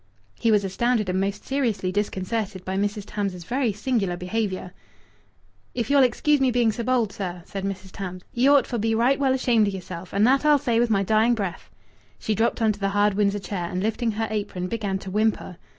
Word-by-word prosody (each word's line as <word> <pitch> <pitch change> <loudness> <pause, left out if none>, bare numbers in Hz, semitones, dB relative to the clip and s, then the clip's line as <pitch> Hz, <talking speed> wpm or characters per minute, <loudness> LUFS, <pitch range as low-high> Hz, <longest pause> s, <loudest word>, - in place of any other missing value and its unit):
He 230 - +2
was 210 -2 +4
astounded 215 +2 0
and 185 +1 0
most 200 +1 -3
seriously 235 -9 -1
disconcerted 200 0 -2
by 190 - -3
Mrs. 205 +1 -1
Tams's 200 -4 -4
very 245 +4 0
singular 210 -4 -1
behaviour. 185 -1 -3 1.0
"If 235 +1 -2
ye'll 285 -1 +6
excuse 270 +3 +2
me 265 - +4
being 240 -2 +2
so 235 - -4
bold, 235 -4 +1
sir," 180 -3 -5
said 195 -2 -6
Mrs. 190 -1 -5
Tams, 185 -2 -6
"ye 245 +3 +3
ought 285 -1 +5
for 240 - -3
be 225 +1 +1
right 250 +5 +2
well 265 -2 +2
ashamed 235 -5 +3
o' - - +1
yeself. 185 -2 -7
And 200 +2 +3
that 270 +4 +3
I'll 300 -1 +5
say 235 -4 0
with 240 0 +2
my 200 -2 +2
dying 220 +4 +3
breath." 195 -6 -5 0.5
She 220 - -2
dropped 225 +2 0
on 220 - +4
to 205 - -7
the 195 -1 0
hard 205 +1 +2
Windsor 200 0 +1
chair, 190 -3 -4
and, 185 +1 -3
lifting 225 +1 0
her 225 +1 -1
apron, 205 -4 -3
began 205 -3 -2
to 190 0 -8
whimper. 210 -3 0
210 Hz, 215 wpm, -24 LUFS, 195-235 Hz, 1.0 s, ye'll